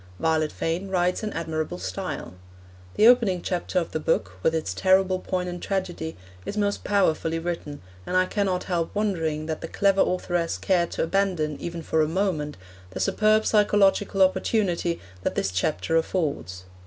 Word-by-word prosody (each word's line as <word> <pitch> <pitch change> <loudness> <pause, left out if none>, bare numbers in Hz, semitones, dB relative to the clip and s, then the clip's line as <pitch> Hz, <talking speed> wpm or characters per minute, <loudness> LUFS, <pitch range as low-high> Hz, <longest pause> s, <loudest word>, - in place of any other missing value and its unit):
Violet 160 -1 +1
Fane 170 +4 -2
writes 180 -1 +1
an 215 -1 -3
admirable 155 - -3
style. 90 -1 -5 0.6
The 215 - +4
opening 220 -8 +4
chapter 180 0 -2
of 175 - 0
the 155 - -2
book, 150 - 0
with 160 - +2
its 155 - -2
terrible 185 - +3
poignant 180 -1 -3
tragedy, 175 -5 -3 0.3
is 205 - -5
most 205 -1 0
powerfully 165 -5 +1
written, 165 - -5 0.2
and 185 - +1
I 185 - +4
cannot 190 -2 -1
help 170 -1 -2
wondering 165 -7 -1
that 160 -1 -4
the - - -4
clever 195 +2 +2
authoress 175 -2 0
cared 175 -3 +1
to - - 0
abandon, 170 -4 0
even 170 -1 -5
for 160 +1 +1
a 155 - +2
moment, 160 -4 -1 0.3
the 95 - -7
superb 215 0 +3
psychological 205 -2 +3
opportunity 185 -3 +1 0.2
that - - -2
this 95 - 0
chapter 90 - -1
affords. 145 - -1
175 Hz, 160 wpm, -25 LUFS, 160-195 Hz, 0.6 s, The